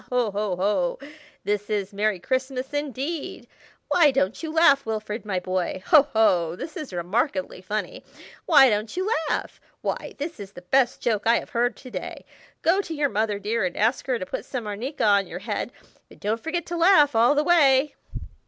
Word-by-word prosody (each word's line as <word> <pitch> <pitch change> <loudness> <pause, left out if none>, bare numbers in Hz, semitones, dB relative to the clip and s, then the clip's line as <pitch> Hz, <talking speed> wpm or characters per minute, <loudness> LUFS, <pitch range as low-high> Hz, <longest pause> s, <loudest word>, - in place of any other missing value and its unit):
ho! 245 -4 +1
ho! 200 -2 -2
ho! 185 -1 0 0.4
this 205 0 -2
is 205 -1 -2
Merry 210 0 0
Christmas, 260 +5 -3
indeed! 290 +2 -4 0.4
Why 325 -4 +5
don't 230 -7 0
you 320 -2 -4
laugh, 315 -4 +5
Wilfrid, 215 0 -4
my 190 -3 0
boy? 185 0 -3
Ho! 290 -2 +6
ho! 175 -7 +3
this 315 - -8
is 305 -7 -6
remarkably 185 - -2
funny. 210 +3 -4 0.4
Why 290 -5 +7
don't 215 +7 -2
you 375 +2 -1 0.2
laugh? - - -3 0.2
Why, - - -4
this 300 -1 -5
is 200 -1 -9
the 180 - -11
best 250 +7 +1
joke 220 -3 0
I 235 +1 +5
have - - -7
heard 240 +1 0
to 255 - -12
day. - - -7 0.4
Go 370 +5 +3
to 330 -5 -6
your 290 -1 +1
mother, 210 -2 -1
dear, 215 +2 -1
and 180 -1 -2
ask 225 +6 +1
her 255 -2 +1
to 185 - -5
put - - -5
some 250 -4 -5
arnica 225 +8 -4
on 200 -2 +3
your - - -7
head, - - -4 0.4
but - - -17
don't 220 +3 -2
forget 345 +4 -3
to 345 - -4
laugh 330 -6 +5
all 235 +6 +4
the 295 - +2
way." 295 -4 +4
230 Hz, 190 wpm, -24 LUFS, 205-285 Hz, 0.4 s, Why